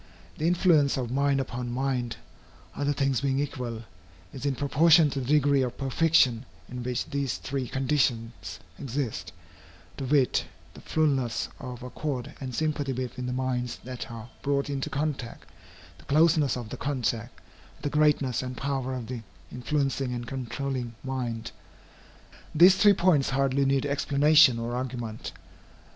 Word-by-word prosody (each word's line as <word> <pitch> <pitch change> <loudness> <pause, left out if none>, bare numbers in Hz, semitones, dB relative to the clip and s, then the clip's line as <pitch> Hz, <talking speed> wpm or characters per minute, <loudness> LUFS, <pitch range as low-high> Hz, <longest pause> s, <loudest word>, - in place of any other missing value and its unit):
The 155 - +1
influence 170 -6 +3
of 125 -3 -3
mind 140 +1 +2
upon 125 -2 -4
mind, 125 -2 -1 0.6
other 145 0 0
things 135 -3 0
being 135 -1 0
equal, 125 -5 -3 0.5
is 135 +2 -4
in 140 - 0
proportion 155 +3 +5
to 140 - -2
the 125 - -4
degree 145 -1 +4
of 125 -1 -2
perfection 135 -3 +2 0.2
in 125 0 -6
which 125 0 -2
these 140 -9 -2
three 130 +8 -3
conditions 125 -3 -1 0.2
exist, 135 -3 -3 0.7
to 135 - -4
wit, 135 -1 +2 0.3
the - - -12
fulness 135 -7 0
of 125 -1 -7
accord 125 0 -4
and 130 -3 -5
sympathy 145 -2 -1
between 125 0 -4
the - - -2
minds 125 -1 -2
that 125 0 -6
are 115 -1 -8
brought 140 0 0
into 135 -1 -2
contact, 140 -5 -3 0.5
the - - -17
closeness 150 -2 +3
of 120 -3 -6
the - - -6
contact, 125 -4 -2 0.4
and - - -22
the 145 - 0
greatness 150 -5 +3
and 125 -1 -6
power 135 -2 -2
of 125 -2 -5
the 120 0 -5 0.3
influencing 135 0 -1
and 120 0 -5
controlling 130 -1 -4
mind. 125 -4 -3 1.0
These 180 +4 +8
three 205 0 +6
points 175 -7 +3
hardly 135 0 +1
need 135 0 +2
explanation 145 -1 +5
or 115 +1 -3
argument. 120 -3 -4
135 Hz, 150 wpm, -27 LUFS, 125-145 Hz, 1.0 s, These